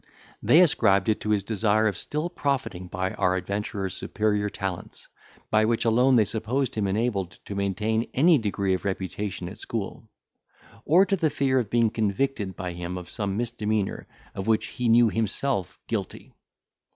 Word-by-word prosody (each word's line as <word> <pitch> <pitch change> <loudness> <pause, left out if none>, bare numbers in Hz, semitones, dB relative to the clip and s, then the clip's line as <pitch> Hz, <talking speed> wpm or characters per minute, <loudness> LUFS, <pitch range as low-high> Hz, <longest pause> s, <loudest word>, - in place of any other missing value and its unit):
They 165 - +6
ascribed 110 - +4
it 110 - +1
to 105 - -3
his 105 -2 +2
desire 110 0 +1
of 105 - -1
still 150 - -3
profiting 135 - -2
by 95 +1 -2
our 95 0 +1
adventurer's 100 +1 -3
superior 105 -1 -1
talents, 95 -3 -6 0.4
by 110 0 +4
which 115 +1 0
alone 125 +3 +4
they 110 -3 +5
supposed 115 +5 -1
him 105 -2 -1
enabled 100 -3 -1
to - - -6
maintain 105 +3 -1
any 160 +3 +4
degree 100 -3 0
of 90 - -2
reputation 95 -1 -3
at 95 +5 -9
school; 110 0 -5 0.8
or 180 +6 +5
to 195 0 +1
the 165 -4 +1
fear 135 -2 +1
of 115 -5 -3
being 115 -1 +2
convicted 110 -1 -1
by 90 -3 -5
him 90 +1 -5
of 90 -1 -9
some 100 -2 -2
misdemeanour 110 -3 -2 0.3
of 95 +1 -5
which 110 -1 +2
he 125 -2 -2
knew 120 +1 +6
himself 110 -2 -1
guilty. - - -5
105 Hz, 165 wpm, -26 LUFS, 95-120 Hz, 0.8 s, They